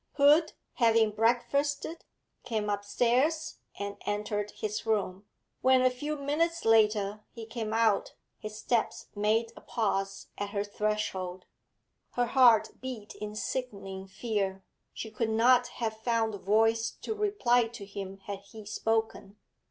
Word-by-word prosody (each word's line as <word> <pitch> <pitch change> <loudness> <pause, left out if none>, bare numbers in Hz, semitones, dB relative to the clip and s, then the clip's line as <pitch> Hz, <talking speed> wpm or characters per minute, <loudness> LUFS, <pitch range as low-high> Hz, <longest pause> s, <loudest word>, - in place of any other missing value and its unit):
Hood, 295 +3 +5 0.2
having 225 -3 +4
breakfasted, 265 +8 0 0.4
came 215 -3 -1
upstairs 245 +10 +1 0.2
and 200 0 -4
entered 210 0 -1
his 210 0 -4
room; 200 -2 -1 0.3
when, 260 0 +5
a 255 - +5
few 295 +4 -3
minutes 330 +4 0
later, 210 -2 +3
he 230 -2 -9
came 220 -1 -4
out, 220 -2 +2 0.2
his 215 0 -7
steps 235 0 -1
made 220 +2 +1
a - - -12
pause 195 -3 -2
at 205 0 -2
her 200 0 -1
threshold. 205 -3 -2 0.7
Her 245 - +2
heart 240 -3 +4
beat 245 -5 -6
in 210 0 -7
sickening 200 -6 -4
fear; 195 -2 -2 0.3
she 220 - -7
could 225 +1 -1
not 245 +3 +4
have 220 -2 -4
found 225 -1 +1
voice 225 +3 +3
to 440 - -2
reply 395 - +2
to 225 -3 -9
him 195 -1 -7
had 200 -1 -5
he 200 +2 -12
spoken. 220 -1 -1
220 Hz, 135 wpm, -30 LUFS, 205-245 Hz, 0.7 s, Hood